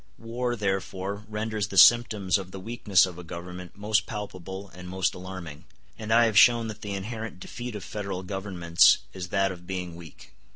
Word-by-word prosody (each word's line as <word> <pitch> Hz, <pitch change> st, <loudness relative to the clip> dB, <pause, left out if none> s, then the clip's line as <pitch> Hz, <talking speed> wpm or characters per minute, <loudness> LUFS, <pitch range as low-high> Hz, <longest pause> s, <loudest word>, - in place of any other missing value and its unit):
War 120 Hz, +2 st, -3 dB
therefore 100 Hz, 0 st, -3 dB
renders 105 Hz, -1 st, -2 dB
the 100 Hz, -, -6 dB
symptoms 105 Hz, -4 st, +6 dB
of 95 Hz, -1 st, -8 dB
the 95 Hz, -, -8 dB
weakness 100 Hz, -2 st, +3 dB
of 90 Hz, -2 st, -8 dB
a -, -, -8 dB
government 90 Hz, +1 st, -8 dB
most 105 Hz, +1 st, +1 dB
palpable 100 Hz, -3 st, -7 dB
and 90 Hz, 0 st, -10 dB
most 95 Hz, 0 st, 0 dB
alarming; 90 Hz, -4 st, -8 dB, 0.3 s
and 110 Hz, 0 st, -6 dB
I 120 Hz, +1 st, +6 dB
have 110 Hz, -3 st, +5 dB
shown 115 Hz, -2 st, +5 dB
that 110 Hz, 0 st, -8 dB
the 100 Hz, -2 st, -4 dB
inherent 110 Hz, +1 st, -6 dB
defeat 120 Hz, +3 st, -7 dB
of 105 Hz, -, -6 dB
federal 100 Hz, -3 st, -5 dB
governments 90 Hz, -3 st, +3 dB, 0.2 s
is 90 Hz, -1 st, -6 dB
that 95 Hz, +1 st, +1 dB
of 90 Hz, -1 st, -10 dB
being 90 Hz, -3 st, -4 dB
weak. 85 Hz, -3 st, -13 dB
95 Hz, 180 wpm, -27 LUFS, 90-110 Hz, 0.3 s, symptoms